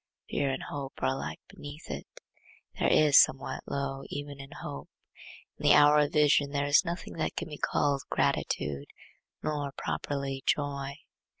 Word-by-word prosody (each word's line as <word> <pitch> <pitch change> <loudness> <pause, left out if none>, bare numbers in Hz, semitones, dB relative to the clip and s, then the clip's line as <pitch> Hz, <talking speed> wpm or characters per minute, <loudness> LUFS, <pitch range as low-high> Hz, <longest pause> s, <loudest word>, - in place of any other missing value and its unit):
Fear 140 - +1
and 135 - -3
hope 140 -2 -5
are - - +4
alike 135 - -5
beneath 145 +2 -9
it. - - -6 0.7
There - - +3
is 150 -2 +8
somewhat 135 - -1
low 135 -1 -3
even 145 -1 -6
in 135 0 -9
hope. 70 - -7 0.7
In - - -9
the - - +8
hour 150 0 +7
of 145 -1 +1
vision 145 -1 +4
there 140 0 -1
is 145 +6 +5
nothing 175 0 -5
that - - -1
can - - -4
be 150 - -8
called 140 -2 +1
gratitude, 70 -1 0 0.6
nor 145 -2 -2
properly 140 -2 -3
joy. 140 -1 0
140 Hz, 160 wpm, -29 LUFS, 135-145 Hz, 0.7 s, is